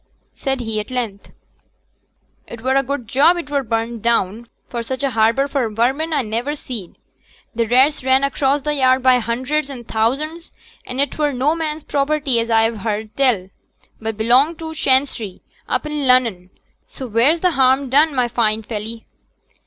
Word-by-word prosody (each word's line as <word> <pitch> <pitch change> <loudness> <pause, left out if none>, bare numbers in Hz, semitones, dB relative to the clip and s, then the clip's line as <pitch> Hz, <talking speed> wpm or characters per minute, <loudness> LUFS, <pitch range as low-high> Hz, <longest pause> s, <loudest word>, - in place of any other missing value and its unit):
said 270 -2 -2
he 220 -2 -3
at 210 - -6
length, 235 -6 -4 1.2
'it 235 - -9
were 260 +2 0
a 275 - +4
good 270 -3 -4
job 290 +9 +4
it 335 -4 -6
were 285 -1 +1
brenned 230 -1 -3
down, 230 0 0 0.2
for 235 - -4
such 260 +4 -4
a 275 - +1
harbour 230 +4 +2
for 275 -5 -1
vermin 260 +9 0
a 290 -4 +1
never 235 +7 -2
seed: 230 - -8 0.6
t' 230 0 +1
rats 260 +5 +3
ran 260 +1 +3
across 275 0 +1
t' 300 - -1
yard 260 -3 +2
by 255 -1 +5
hunders 260 +6 -2
an' 255 -4 -8
thousands; 275 +10 -2 0.4
an' 255 +1 -5
it 285 +2 -1
were 295 -1 +2
no 270 +4 +1
man's 315 -2 -3
property 280 -3 0
as 230 0 -2
a've 225 -1 +2
heerd 215 0 -4
tell, 235 -9 +1 0.5
but 220 -1 -4
belonged 255 +9 +3
to 320 -1 -6
Chancery, 260 -9 0 0.3
up - - -1
i' - - -4
Lunnon; 250 -10 +1 0.4
so 265 - -8
wheere's 250 +9 +3
t' 365 - +3
harm 265 -1 +3
done, 290 +3 +3
my 250 -1 +2
fine 225 -2 0
felly?' 220 +1 -6
255 Hz, 175 wpm, -19 LUFS, 230-280 Hz, 1.2 s, by